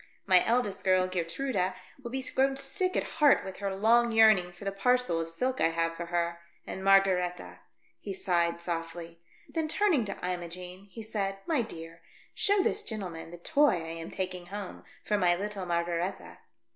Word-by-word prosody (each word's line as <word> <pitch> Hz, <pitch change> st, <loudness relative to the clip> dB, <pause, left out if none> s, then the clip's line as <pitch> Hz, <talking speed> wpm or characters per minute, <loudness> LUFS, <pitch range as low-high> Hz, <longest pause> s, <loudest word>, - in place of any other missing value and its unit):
My 185 Hz, -2 st, +6 dB
eldest 230 Hz, -4 st, 0 dB
girl, 185 Hz, -1 st, +4 dB
Geertruida, 185 Hz, +2 st, -1 dB, 0.3 s
will 240 Hz, -, -6 dB
be 265 Hz, +2 st, -3 dB
grown 270 Hz, +1 st, +1 dB
sick 365 Hz, +8 st, 0 dB
at -, -, +1 dB, 0.2 s
heart 290 Hz, -2 st, +6 dB
with 190 Hz, -1 st, -7 dB
her 200 Hz, -1 st, -3 dB
long 235 Hz, +4 st, +4 dB
yearning 215 Hz, -5 st, +5 dB
for 175 Hz, +3 st, -12 dB
the 195 Hz, -, 0 dB
parcel 250 Hz, -2 st, +1 dB
of 165 Hz, -, -4 dB
silk 255 Hz, +10 st, -2 dB
I 165 Hz, -, +5 dB
have 165 Hz, 0 st, 0 dB
for 170 Hz, 0 st, -6 dB
her. 170 Hz, 0 st, -1 dB, 0.3 s
And 190 Hz, -, -6 dB
Margaretha 190 Hz, -2 st, +2 dB, 0.2 s
" -, -, -38 dB
he 200 Hz, -, -5 dB
sighed, 170 Hz, -2 st, 0 dB
softly. 165 Hz, 0 st, -5 dB, 0.3 s
Then 320 Hz, -2 st, -2 dB
turning 325 Hz, -, +2 dB
to 200 Hz, -, -5 dB
Imogene, 180 Hz, +1 st, -6 dB
he 225 Hz, +3 st, -9 dB
said, 200 Hz, -3 st, -2 dB
" -, -, -32 dB
My 310 Hz, -6 st, +1 dB
dear, 165 Hz, -6 st, -8 dB, 0.3 s
show 405 Hz, -2 st, +2 dB
this 420 Hz, -, 0 dB
gentleman 185 Hz, -, -6 dB
the 175 Hz, -, -9 dB
toy 285 Hz, -, +3 dB
I 165 Hz, -2 st, -5 dB
am 165 Hz, -, -7 dB
taking 180 Hz, -2 st, -4 dB
home 200 Hz, 0 st, -7 dB, 0.2 s
for 210 Hz, -1 st, +1 dB
my 175 Hz, -2 st, +4 dB
little 200 Hz, 0 st, -4 dB
Mar 170 Hz, 0 st, +1 dB
garetha." 175 Hz, +2 st, -4 dB
190 Hz, 185 wpm, -29 LUFS, 175-230 Hz, 0.3 s, My